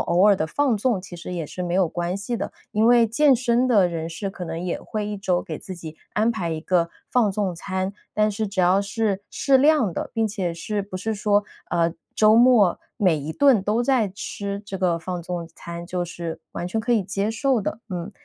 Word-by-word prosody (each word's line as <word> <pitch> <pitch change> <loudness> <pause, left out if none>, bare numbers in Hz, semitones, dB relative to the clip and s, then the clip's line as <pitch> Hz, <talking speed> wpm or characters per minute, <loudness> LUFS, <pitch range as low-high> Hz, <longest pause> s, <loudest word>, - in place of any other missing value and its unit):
偶 180 +4 +3
尔 205 - +7
的 170 - -1
放 265 - +1
纵 215 -2 +1
其 180 -1 -11
实 170 +1 -7
也 170 -3 -3
是 180 - -6
没 175 - -3
有 190 -2 +4
关 175 +2 -2
系 205 +4 -3
的。 - - -4 0.2
因 215 +2 +3
为 240 -1 +6
健 265 +4 +4
身 245 +1 +2
的 205 -7 +5
人 165 -1 -4
士 170 +5 -4
可 190 -2 -7
能 165 -1 -4
也 180 0 -3
会 215 -1 -4
一 210 0 -3
周 185 -3 0
给 155 - -5
自 190 - -8
己 160 -2 -9 0.2
安 220 +2 +3
排 180 -7 -3
一 160 -1 -3
个 170 0 +1 0.2
放 235 -5 +3
纵 195 -2 -1
餐， 190 +2 -3 0.2
但 210 0 +3
是 210 +1 -2
只 195 -1 -1
要 185 +2 +4
是 200 -1 -1
适 275 -1 +3
量 285 - +4
的， - - -4
并 225 -1 +2
且 195 -5 -2
是， 205 +5 -3
不 195 -1 -7
是 220 +4 -2
说， 205 0 +2 0.3
呃， 170 -1 +2 0.2
周 215 0 +6
末 230 -6 +5 0.2
每 185 -8 +3
一 150 +2 -4
顿 260 - +4
都 215 +4 +1
在 245 -5 +2
吃 200 +1 -5
这 200 -1 -5
个 180 -3 +1
放 175 +1 -5
纵 175 0 -4
餐， 170 0 -8
就 180 -1 -2
是 170 -1 -6
完 175 - -4
全 220 +5 -1
可 230 +3 -4
以 225 -4 +3
接 200 +2 -1
受 260 +1 +1
的， 210 - -3
嗯。 180 0 -4
195 Hz, 245 characters per minute, -23 LUFS, 175-220 Hz, 0.3 s, 尔